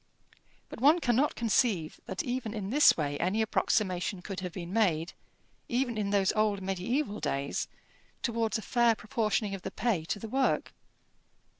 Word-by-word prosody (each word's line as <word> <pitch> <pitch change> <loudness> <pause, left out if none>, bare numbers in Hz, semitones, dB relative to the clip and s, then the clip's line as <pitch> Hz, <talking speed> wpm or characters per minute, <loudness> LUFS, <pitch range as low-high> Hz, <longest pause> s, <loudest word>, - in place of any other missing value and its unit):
But - - -10
one 295 +5 +6
cannot 265 -2 +1
conceive 215 -8 +1
that 190 - -3
even 245 -3 -3
in 205 -1 -4
this 295 +3 +6
way 145 -2 -2
any 185 +5 0
approximation 190 -4 0
could 195 -3 -5
have 180 -1 -5
been 175 0 -7
made, 175 -7 +1 0.6
even 245 -1 0
in 210 -2 -1
those 200 -2 +2
old 215 -2 +1
mediæval 205 +6 -2
days, 140 +1 -2 0.6
towards 230 -3 0
a 220 - -7
fair 235 0 +3
proportioning 215 -3 -1
of 195 - -5
the - - -4
pay 215 -10 -1
to 185 - -2
the 225 - -7
work. 265 +4 0
215 Hz, 160 wpm, -30 LUFS, 185-235 Hz, 0.6 s, one